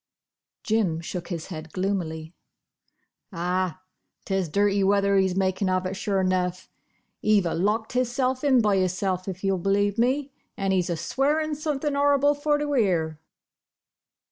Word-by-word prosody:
Jim 215 -9 +1
shook 170 +1 -6
his 170 -2 -5
head 160 -2 -7
gloomily. 175 -4 -3 1.0
"Ah! 180 +1 -2 0.4
'tis 190 -4 -1
dirty 200 +3 +2
weather 200 0 +3
he's 190 -1 +2
makin' 190 0 0
of 185 0 0
it, 185 - -2
sure 195 -1 -1
'nough. 185 0 -1 0.5
He've 210 -3 +3
a 170 - -1
locked 210 +7 0
hisself 255 +1 0
in 265 -4 +4
by 205 -3 +2
hisself 185 0 -1
if 190 0 -6
you'll 195 -1 +1
believe 200 +3 +1
me; 265 +4 +1 0.3
an' 195 -1 0
he's 180 -2 +1
a 170 - -1
swearin' 300 - 0
somethin' 295 -1 -2
'orrible 285 0 +3
for 295 +1 +1
to 295 0 -2
'ear!" 170 - +1
195 Hz, 145 wpm, -25 LUFS, 185-250 Hz, 1.0 s, in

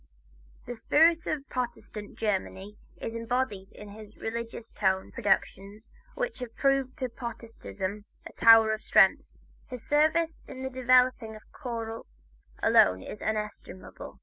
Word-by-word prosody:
The 245 - -5
spirit 320 +8 +3
of 285 -3 -3
Protestant 235 -4 -5
Germany 200 -1 -3 0.2
is 225 - -5
embodied 230 -4 -2
in 210 - -12
his 215 +1 -12
religious 230 0 -6
tone 190 -2 0
productions 200 0 -2 0.2
which - - -3
have 245 -2 -7
proved 275 -1 +1
to 260 -4 -2
Protestantism 225 -4 -6 0.2
a - - -10
tower 225 -1 +6
of 215 - -4
strength. - - +4 0.4
His 250 -3 -8
service 315 +2 +2
in 260 0 -6
developing 255 -2 +3
the 215 - -11
choral 230 -2 -6 0.6
alone 95 0 +4
is 210 - -9
inestimable. 210 -3 -6
230 Hz, 125 wpm, -28 LUFS, 210-255 Hz, 0.6 s, tower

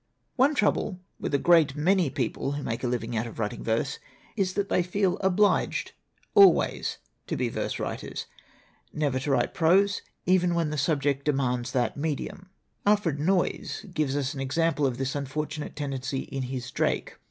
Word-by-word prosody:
"One 280 +3 +4
trouble 205 -4 +1 0.2
with - - -3
a - - +5
great 160 -3 +4
many 175 +1 +2
people 135 +1 -2
who 145 0 -4
make 115 +2 -3
a - - +1
living 120 -1 -2
out 110 +2 -1
of 115 - -10
writing 105 -2 -3
verse 115 +5 -1 0.4
is 190 -3 0
that 200 0 0
they 180 - +2
feel 180 +1 0
obliged 195 +2 +2 0.4
always 400 -2 +5 0.3
to - - -2
be - - 0
verse - - -3
writers, - - -4 0.7
never 145 -4 0
to 135 - -4
write 125 -3 +1
prose, 190 +4 +3 0.2
even 180 -1 +3
when 165 -3 0
the 150 - -2
subject 140 -2 +1
demands 130 -4 0
that 125 +1 0
medium. 160 +5 -4 0.3
Alfred 205 -8 +2
Noyes 180 +4 0
gives 145 -4 0
us 140 -1 -1
an 140 - -7
example 145 +1 +1
of 125 -2 -3
this 135 +1 -2
unfortunate 150 +2 -4
tendency 135 -2 -3
in 135 - -5
his 125 -2 -5
Drake. - - -1
150 Hz, 170 wpm, -27 LUFS, 135-180 Hz, 0.7 s, a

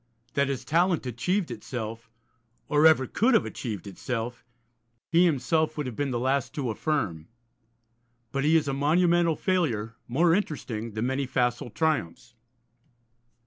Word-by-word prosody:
That 140 0 +2
his 130 -3 -3
talent 170 +2 +2
achieved 175 - -1
itself, 115 -1 -6 0.6
or 150 +2 +5
ever 155 -5 +4
could 235 - +2
have 225 - +3
achieved 105 -7 -5
itself, 115 +4 -4 0.7
he 170 +2 +5
himself 160 0 +1
would 150 - -2
have 125 -3 -5
been 145 +3 -1
the 125 - -1
last 130 +3 0
to 135 -7 -1
affirm. 105 - -2 1.0
But 135 +2 -1
he 155 +2 +4
is 160 -3 +3
a 135 - 0
monumental 170 +3 +3
failure, 140 - 0
more 165 +7 +3
interesting 120 - -2
than 110 +2 -2
many 130 +1 -1
facile 125 -1 0
triumphs. 120 - -1
135 Hz, 145 wpm, -27 LUFS, 120-160 Hz, 1.0 s, or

